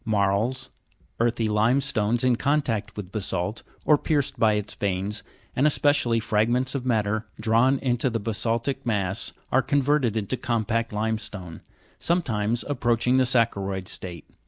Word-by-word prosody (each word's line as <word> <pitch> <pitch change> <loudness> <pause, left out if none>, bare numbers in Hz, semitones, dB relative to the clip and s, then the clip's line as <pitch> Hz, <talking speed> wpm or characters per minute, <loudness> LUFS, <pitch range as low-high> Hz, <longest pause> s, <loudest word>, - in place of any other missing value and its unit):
Marls, 110 +5 0 0.5
earthy 115 -1 +1
limestones 115 +1 +1
in 125 -1 +4
contact 135 -7 -1
with 95 -3 -6
basa'lt, 100 0 -2 0.2
or 150 -2 +5
pierced 145 -4 -1
by 110 -1 +4
its 105 -1 -2
veins, 100 +1 -2 0.3
and 140 +4 +3
especially 145 -6 +2
fragments 120 +4 +1
of 130 -2 -3
matter 110 -1 0
drawn 120 +4 +3
into 125 -1 0
the 115 -1 -2
basa'ltic 115 +4 -1
mass, 100 -4 -1 0.2
are 130 - +4
converted 135 -3 +1
into 110 +4 -1
compact 115 -1 -1
limestone, 105 -5 -4 0.4
sometimes 120 - 0
approach 120 -5 0
ing 125 +1 +4
the 130 - +4
saccharo'id 100 -6 +1
state. 85 -4 -5
115 Hz, 135 wpm, -25 LUFS, 105-130 Hz, 0.5 s, or